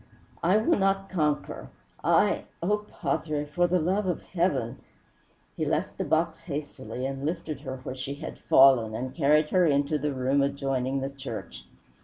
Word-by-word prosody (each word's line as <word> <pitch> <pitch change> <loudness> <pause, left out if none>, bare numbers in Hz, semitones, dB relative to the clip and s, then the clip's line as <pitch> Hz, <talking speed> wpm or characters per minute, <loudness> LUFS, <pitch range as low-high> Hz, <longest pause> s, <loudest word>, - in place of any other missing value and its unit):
"I 180 +5 +4
will 215 -1 +2
not 195 0 +1
conquer. 150 -5 -1 0.3
I - - +3 0.2
Oh, 210 +3 0
padre 150 -2 -2
for 175 +4 +1
the 180 +1 +2
love 185 +4 0
of 180 - -2
heaven 150 -10 -1 0.4
" - - -37
He - - -2
left - - -1
the - - +1
box 160 +1 0
hastily 140 -4 -5
and 135 0 -4
lifted 160 0 -3
her 130 - -5
where 130 - -4
she 135 +2 -5
had 155 +3 -8
fallen 125 -5 +5
and 130 +3 -4
carried 150 0 +3
her 180 -2 +4
into 145 +1 +2
the 150 +1 -1
room 135 +1 +1
adjoining 135 -1 -1
the 135 +1 -3
church. 115 - -7
145 Hz, 170 wpm, -27 LUFS, 135-170 Hz, 0.4 s, fallen